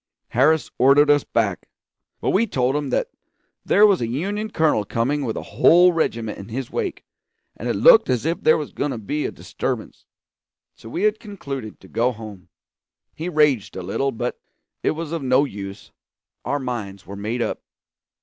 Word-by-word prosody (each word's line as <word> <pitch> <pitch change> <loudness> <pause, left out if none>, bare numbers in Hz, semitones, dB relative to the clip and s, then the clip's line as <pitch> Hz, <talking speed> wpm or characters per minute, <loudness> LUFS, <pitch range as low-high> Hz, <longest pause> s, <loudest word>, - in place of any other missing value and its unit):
Harris 150 +6 +2
ordered 145 +3 +6
us 145 -1 +3
back; 100 -6 -1 0.5
but - - +1
we 225 +4 +2
told 130 - 0
him 145 -2 -2 0.7
there 205 +2 +5
was 200 -7 +3
a 115 - 0
Union 200 - -2
colonel 155 - +2
coming 130 +8 -1
with 115 -4 -3
a - - -4 0.2
whole 175 +1 +7
regiment 115 -9 -2
in 100 - -9
his 130 +4 -5
wake, 405 -6 -3 0.5
and - - -5
it - - 0
looked - - +6
as 125 +1 0
if 165 +2 -1
there 155 - +5
was 150 -3 -5
going 145 - -2
to 130 - -3
be 145 +8 -2
a - - -5
disturbance; - - -5 0.7
so 115 - -13
we 175 - -3
had 215 0 +2
concluded 140 - -7
to 95 - -16
go 120 +6 +1
home. 105 -5 -10 0.6
He 165 +3 -5
raged 150 - +2
a 95 - -5
little, 135 +9 -1
but 120 +1 -4 0.4
it - - +1
was 165 -2 -5
of 165 -2 -2
no 130 +2 +3
use; 100 -5 -8 0.5
our 145 - 0
minds 110 -8 -5
were 100 - -8
made 110 +4 -2
up. - - -3
135 Hz, 180 wpm, -22 LUFS, 115-160 Hz, 0.7 s, whole